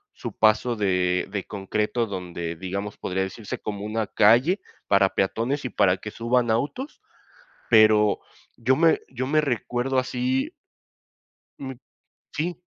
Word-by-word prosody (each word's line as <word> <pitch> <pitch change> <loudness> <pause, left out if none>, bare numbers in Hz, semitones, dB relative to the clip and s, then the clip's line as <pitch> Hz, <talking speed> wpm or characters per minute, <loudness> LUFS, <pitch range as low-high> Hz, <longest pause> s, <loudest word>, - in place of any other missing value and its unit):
su - - -6
paso 110 +2 +3
de 90 -3 +1
de 100 -2 -2
concreto 105 +4 -1
donde, 85 -4 -5
digamos, 100 +4 -5
podría 95 +1 -2
decirse, 95 +2 -6
como 105 -1 -5
una 110 0 -1
calle 125 - +4 0.3
para 100 -1 +4
peatones 120 +8 -1
y - - -1
para 95 -3 +3
que 105 - -8
suban 120 0 +1
autos, 150 - -2 0.7
pero 110 -2 +5 0.4
yo 125 +3 +2
me 165 +1 +4
yo 130 0 -4
me 155 +1 +3
recuerdo 130 -1 -1
así 130 +1 0 1.1
me 130 -2 -7 0.6
sí. 165 +3 -2
110 Hz, 130 wpm, -25 LUFS, 100-130 Hz, 1.1 s, pero